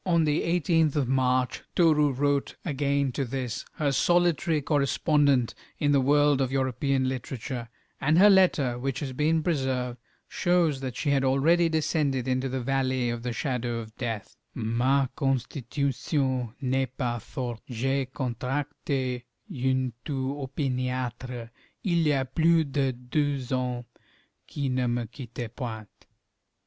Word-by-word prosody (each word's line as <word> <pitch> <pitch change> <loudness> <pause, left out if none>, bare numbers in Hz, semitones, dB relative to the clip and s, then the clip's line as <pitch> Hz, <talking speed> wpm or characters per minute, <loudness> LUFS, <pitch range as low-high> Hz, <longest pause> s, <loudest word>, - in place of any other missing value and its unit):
On 170 -3 +3
the 150 -1 +2
18th 165 -3 +2
of 140 -4 +1
March 130 -1 +1
Toru 155 -4 +4
wrote 140 +1 0
again 140 -3 0
to 135 - -2
this, 125 -2 -3
her 145 -2 0
solitary 175 0 +2
correspondent 140 -2 +2 0.2
in 145 - +2
the 140 -1 +4
world 145 +1 +4
of 130 -1 0
European 135 0 +1
literature, 130 -2 -4 0.3
and 155 +3 +3
her 200 +3 +8
letter, 150 -10 +3
which 130 0 -2
has 135 -3 -4
been 155 +4 +1
preserved, 130 -6 -1 0.3
shows 175 -5 +2
that 130 -2 -5
she 145 - 0
had 135 -1 +2
already 160 +6 +3
descended 150 -5 0
into 130 +1 0
the 130 0 -2
valley 130 -1 0
of 120 0 -4
the 125 0 -3
shadow 120 -1 -2
of 110 -1 -8
death: 115 -5 -4 0.2
Ma 125 +5 +2
constitution 130 -1 -1
n'est 130 -1 -1
pas 120 -3 -1
forte; 120 -4 -5
j'ai 135 +3 0
contracté 130 0 -2 0.3
une 130 -1 0
toux 135 -2 -2
opiniâtre, 125 -3 -3 0.3
il 170 -5 +2
y - - +4
a 135 -1 +1
plus 165 +5 +3
de 140 -1 0
deux 130 +1 -2
ans, 125 -1 -1 0.6
qui 140 -2 -3
ne 125 -1 0
me 120 0 -1
quitte 120 -1 -8
point. 110 -5 -5
135 Hz, 140 wpm, -27 LUFS, 125-145 Hz, 0.6 s, her